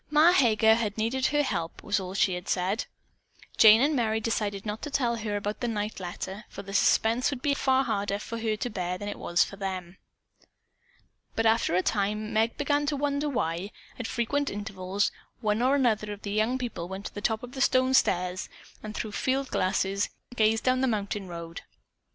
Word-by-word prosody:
"Ma 305 +3 +6
Heger" 220 -8 +5
had 220 -2 -1
needed 240 +4 +1
her 295 +1 +2
help, 170 -10 -3
was 205 0 +1
all 185 -1 -5
that - - -4
she 180 -3 +2
said. 190 +5 0 0.7
Jane 220 +1 +8
and 295 +1 +2
Merry 220 -3 +1
decided 210 -3 -2
not 210 +1 -4
to 295 - -4
tell 245 -5 0
her 215 -2 -2
about 205 +1 -3
the 240 - -1
night 210 -2 -3
letter, 190 +3 -6
for 200 - -8
the 195 0 -8
suspense 225 +4 +3
would 270 -3 -5
be 285 - +2
far 265 -1 +2
harder 200 -4 -1
for 230 +2 -6
her 220 -1 0
to 245 - -3
bear 180 -2 -2
than 205 - -6
it 205 - -5
was 175 +1 +2
for 195 - -8
them. 185 -2 -5 1.4
But 225 - 0
after 225 -5 +3
a 185 - +2
time 210 +1 -1
Meg 225 +2 +1
began 290 0 +1
to 295 - +1
wonder 290 +1 0
why, 175 - -2 0.3
at 240 - -3
frequent 280 +4 -1
intervals, 200 -1 -2 0.3
one 215 -1 0
or 260 +3 +4
another 220 -6 +1
of 205 0 -8
the 200 - -4
young 215 +5 +1
people 235 -9 -4
went 190 +2 -7
to - - -6
the 205 - -6
top 220 +2 0
of 245 - -8
the 265 - -5
stone 260 -1 +3
stairs, 180 -6 +1 0.3
and 215 0 -7
through 215 - -3
field 265 +5 -1
glasses, 195 +2 0 0.3
gazed 220 0 +2
down 255 0 +2
the 265 - +2
mountain 205 -3 -2
road. 170 -1 -7
215 Hz, 205 wpm, -28 LUFS, 200-250 Hz, 1.4 s, Jane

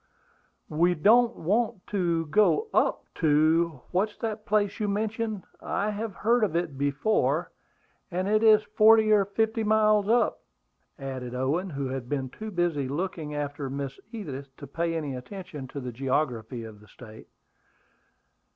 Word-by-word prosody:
"We 170 +3 +3
don't 235 +8 +4
want 215 +2 -1
to 170 -5 0
go 215 - +2
up - - +2
to 155 -1 +3
what's 205 +4 0
that 220 -1 -4
place 205 -1 +1
you 210 - 0
mentioned? 215 0 -2 0.2
I 205 +2 -1
have 210 -1 -4
heard 230 +2 +2
of 190 -6 0
it 170 -4 -1
before, 145 +10 0 0.6
and 185 +1 -2
it 215 +1 +3
is 215 -1 +6
forty 220 +1 +5
or 205 -2 +5
fifty 220 +3 0
miles 215 -1 +3
up," 235 +1 +2 0.6
added 130 -3 -6
Owen, 145 +9 -1
who 140 -4 -3
had 130 -2 -5
been 135 -3 -2
too 220 0 -7
busy 175 -8 0
looking 155 0 -4
after 145 -1 -3
Miss 135 0 -5
Edith 145 - -6
to - - -9
pay 165 0 -2
any 145 -4 -3
attention 150 0 -8
to 140 - -7
the 125 -2 -5
geography 125 -2 -2
of 110 -2 -10
the 105 - -18
State. 110 -2 -13
175 Hz, 150 wpm, -27 LUFS, 140-215 Hz, 0.6 s, is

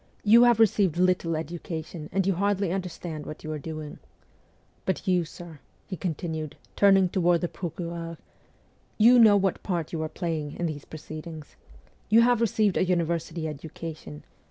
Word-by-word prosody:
You 225 +3 +7
have 240 -2 +4
received 205 -6 +3
little 180 -2 +2
education, 160 0 -6
and 195 -1 +1
you 195 - +2
hardly 200 0 0
understand 175 -4 -5
what 155 - -8
you 155 - -5
are 155 - -4
doing. 155 0 -7 0.8
But 190 - -2
you, 180 -2 +2
sir,' 165 -1 -11 0.3
he 190 - -5
continued, 160 -3 -4 0.2
turning 195 -2 +5
toward 175 -1 +2
the 175 - 0
procureur, 170 -1 -6 0.4
' - - -37
you 245 0 +7
know 215 -3 +7
what 195 -2 0
part 175 -5 -3
you 160 - -2
are 155 - -2
playing 160 -4 -4
in 175 - -2
these 150 -3 -4
pro 155 - -9
ceedings. 155 0 -9 0.5
You 225 +2 +6
have. 240 -1 +3
received 215 -3 +2
a - - +3
university 170 -2 -1
education. 150 - -8
170 Hz, 165 wpm, -26 LUFS, 160-190 Hz, 0.8 s, You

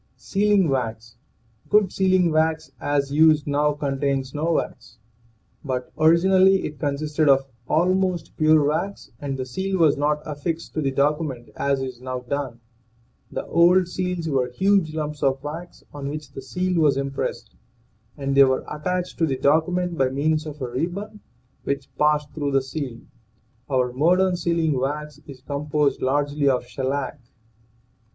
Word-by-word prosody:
SEALING 205 -2 +2
WAX. 115 -5 -3 0.5
Good 210 -3 +3
sealing 185 -3 +3
wax, 155 -3 +1
as 140 -1 0
used 155 -1 +5
now, 145 +1 +1
con 140 -2 -3
tains 135 -2 -1
no 160 +3 0
wax. - - -4 0.7
But 130 -3 -3
originally 185 +4 +4
it 150 -1 -7
consisted 150 +1 0
of 135 0 +4 0.2
almost 180 +1 +1
pure 155 -1 +4
wax, 190 +7 -3
and 140 -2 -4
the 130 - -3
seal 190 +9 -2
was 155 -5 +4
not 150 +1 0
affixed 155 +3 -4
to 155 - -1
the 140 - +1
document 140 -2 -1
as 140 -1 0
is 130 -2 -7
now 130 -1 -4
done. 125 -2 -4 0.7
The - - -4
old 175 +2 +4
seals 180 -2 -3
were 130 -4 0
huge 185 +2 +1
lumps 150 -1 -4
of 135 0 +1
wax 165 +4 -7
on 140 -1 -5
which 150 -1 -7
the 135 - -8
seal 180 +6 -1
was 145 -3 +3
impressed, 135 0 -4 0.6
and 140 -1 -2
they 140 - +8
were 130 -1 +1
attached 180 +4 -3
to 165 - +3
the 135 -3 -1
document 170 +5 +1
by 135 -1 +3
means 155 +3 0
of 150 0 -8
a - - -2
ribbon 180 - -4 0.4
which 140 -1 -4
passed 150 -1 +2
through 145 -3 -2
the 135 -1 +3
seal. 130 -3 -5 0.7
Our 125 -2 +1
modern 180 +7 +3
sealing 165 -5 0
wax 150 +2 -3
is 135 -3 -11
composed 145 +1 -1
largely 145 +1 +1
of 125 -2 0
shellac. 130 +3 -3
150 Hz, 155 wpm, -23 LUFS, 135-170 Hz, 0.7 s, they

